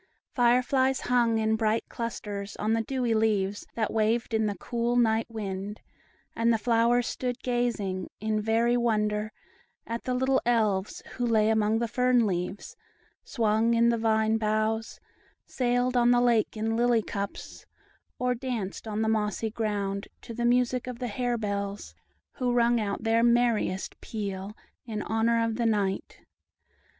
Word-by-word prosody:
Fire 245 0 +4
flies 265 0 +1
hung 240 -2 +2
in 220 0 +1
bright 220 0 +1
clusters 205 -3 -5
on 215 +1 0
the 225 - +2
dewy 245 0 -1
leaves, 205 -3 0
that 220 -2 -1
waved 225 +2 +1
in 220 -1 +2
the 205 - -3
cool 240 0 -1
night 225 -2 +2
wind; 205 -2 -5 0.6
and 230 +1 +2
the 225 - +3
flowers 235 +2 +2
stood 250 +1 -4
gazing, 235 -7 -1
in 215 0 -1
very 230 +2 +2
wonder, 215 -2 0 0.5
at 230 +1 -5
the 255 - 0
little 260 +1 +2
Elves, 215 -5 0
who 245 - 0
lay 220 -2 +3
among 220 0 +2
the 235 +1 0
fern 250 0 +2
leaves, 185 0 -3 0.5
swung 225 0 +1
in 235 0 +4
the 235 - +2
vine 220 0 +2
boughs, 215 +1 -1 0.5
sailed 245 0 0
on 240 -1 +4
the 245 0 +5
lake 235 -3 +2
in 225 +1 -1
lily 235 -1 +3
cups, 200 -1 -6 0.5
or 250 0 +1
danced 230 -5 -4
on 215 0 -1
the - - 0
mossy 215 0 0
ground, 200 -3 -2 0.2
to 230 - -8
the 235 +1 -2
music 250 +1 +2
of 250 -2 -5
the 245 0 -4
hare 245 +2 -1
bells, 200 -2 -4 0.4
who 250 -2 -1
rung 240 0 +3
out 205 -1 -3
their 225 0 +3
merriest 235 -5 +1
peal 200 -1 -5 0.3
in 215 -3 -4
honor 230 +1 +1
of 225 -1 -2
the 235 - 0
night. 200 -3 -1
225 Hz, 160 wpm, -27 LUFS, 215-240 Hz, 0.6 s, the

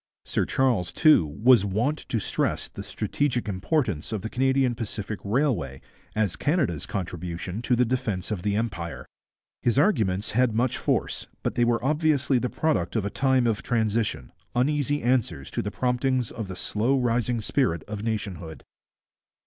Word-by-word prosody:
Sir - - 0
Charles, 120 -10 +1
too, 155 - +5
was 110 - +4
wont 110 +10 -1
to 115 - 0
stress 105 - -1
the - - -9
strategic 125 -6 -1
importance 100 - -1
of 110 -3 -3
the 110 - -4
Canadian 130 0 +2
Pacific 105 -3 -4
Railway 100 - 0 0.4
as 105 -5 +1
Canada's 140 - 0
contribution 90 +1 -4
to 125 +1 +2
the 125 +1 +3
defence 115 -6 -2
of 100 -5 -2
the 100 +1 0
Empire. 85 - -3 0.6
His 120 +1 +1
arguments 110 - +2
had 125 -1 +2
much 120 +2 +1
force, - - -1 0.2
but - - 0
they 120 - +2
were 120 +1 +1
obviously 145 -3 +2
the 125 - -1
product 105 - 0
of 110 -3 0
a 100 - -2
time 130 -2 +2
of 115 0 +1
transition, 110 - -1 0.2
uneasy 145 +3 +1
answers 110 - 0
to - - -1
the 105 - -3
promptings 125 +1 0
of 110 -4 -5
the 95 - -6
slow 115 +8 +1
rising 120 -1 +1
spirit 105 - 0
of 105 -1 -6
nationhood. 100 -8 -4
115 Hz, 160 wpm, -26 LUFS, 100-130 Hz, 0.6 s, too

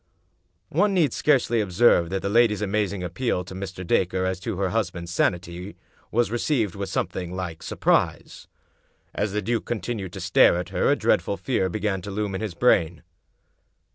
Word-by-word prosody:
One 205 -1 +2
need 155 -9 +3
scarcely 125 -6 +2
observe 90 -3 +3
that 95 +1 -3
the - - 0
lady's 105 -1 +3
amazing 100 -2 -1
ap 90 - -5
peal 115 -8 -1
to 90 - -9
Mr. 95 -1 -6
Dacre 95 +1 +1
as 95 -1 -2
to 90 - -4
her 95 -1 0
husband's 90 -6 -2
sanity 90 +1 -1 0.3
was 120 0 +1
received 120 - 0
with 100 -1 -5
something 90 -1 -3
like 90 -3 -5
surprise. - - 0 0.7
As 105 -1 -1
the 105 +1 -2
duke 115 +3 -1
continued 105 -4 -4
to - - -6
stare - - +4
at 90 - -4
her, - - +1
a - - +4
dreadful - - +1
fear 95 - 0
began 100 0 -2
to 100 - -7
loom 100 0 -2
in 95 - -3
his 105 -6 -4
brain. 85 -8 +2
95 Hz, 175 wpm, -24 LUFS, 90-110 Hz, 0.7 s, stare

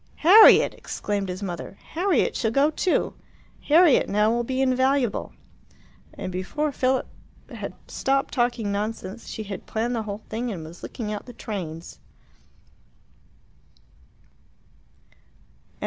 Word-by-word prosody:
"Harriet!" 420 +6 +8
exclaimed 200 -2 -4
his 185 +2 -5
mother. 180 +1 -6 0.2
"Harriet 355 -1 +1
shall 225 - 0
go 275 +6 +3
too. 360 +3 0 0.5
Harriet, 315 -1 +5
now, 210 +2 +2
will 240 +1 0
be 260 +2 -3
invaluable!" 260 -2 +1 0.8
And 185 - -5
before 285 +12 -2
Philip 260 0 0 0.5
had - - -7
stopped 275 0 -1
talking 240 -4 0
nonsense, 210 +1 -4
she 220 - -5
had 200 -1 -8
planned 235 +3 -1
the 230 - -1
whole 210 0 -6
thing 235 +2 -3
and 165 -6 -6
was 165 +2 -12
looking 215 -3 -5
out 210 - -7
the 245 - -9
trains. 175 -8 -7
230 Hz, 120 wpm, -24 LUFS, 200-265 Hz, 0.8 s, Harriet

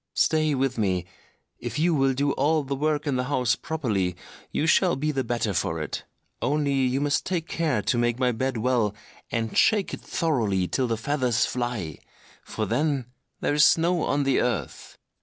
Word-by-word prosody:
Stay 155 -2 +2
with 130 -2 -1
me; 95 -4 0 0.5
if - - -5
you 165 +3 +2
will 135 -3 +2
do 140 +1 +1
all 150 +3 +1
the 140 0 -3
work 150 +1 0
in 140 -3 0
the 125 - -1
house 125 -4 +1
properly, 105 - -2 0.3
you 155 - -1
shall 175 +2 +4
be 150 +3 -1
the 135 -2 -1
better 115 -3 -1
for 80 -2 -1
it. 75 - -5 0.4
Only 145 -1 +1
you 130 -1 +1
must 145 0 +1
take 170 -3 -2
care 150 -11 0
to 120 +4 +1
make 120 0 +1
my 125 -1 +2
bed 130 +2 -2
well, 110 -3 +1 0.3
and 115 -1 -2
shake 210 -3 +3
it - - -6
thoroughly 110 - 0
till 130 +5 0
the 115 -1 -1
feathers 125 -2 +1
fly—for 110 - -5
then 140 +1 -1 0.3
there - - +1
is 150 0 +5
snow 170 +2 +4
on 145 -1 +1
the 135 -1 +2
earth. 120 -6 -3
130 Hz, 180 wpm, -25 LUFS, 115-150 Hz, 0.5 s, is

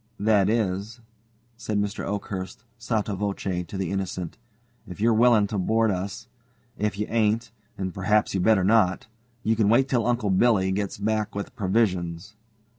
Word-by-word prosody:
"That 105 -1 +3
is," 110 0 -1 0.6
said 110 -2 -3
Mr. 105 0 -2
Oakhurst, 100 0 -5 0.2
sotto 110 -3 -1
voce 95 -2 -2
to 100 - -6
the 95 -2 -2
Innocent, 95 -1 -4 0.5
"if 90 0 -9
you're 115 +2 +3
willing 115 -2 +5
to 100 0 -3
board 110 +3 +2
us. 95 +1 -4 0.5
If 105 -1 -2
you 105 - -1
ain't 115 0 0 0.3
and 95 -2 -3
perhaps 105 +2 +1
you'd 95 - 0
better 100 -1 +4
not 95 -2 +3 0.4
you 115 - +2
can 105 -2 +2
wait 130 +4 +4
till 120 -3 +1
Uncle 115 -5 +1
Billy 95 -1 +3
gets 100 +1 -2
back 110 +1 -1
with 100 +4 -5
provisions." 95 -3 -1
105 Hz, 160 wpm, -25 LUFS, 95-110 Hz, 0.6 s, willing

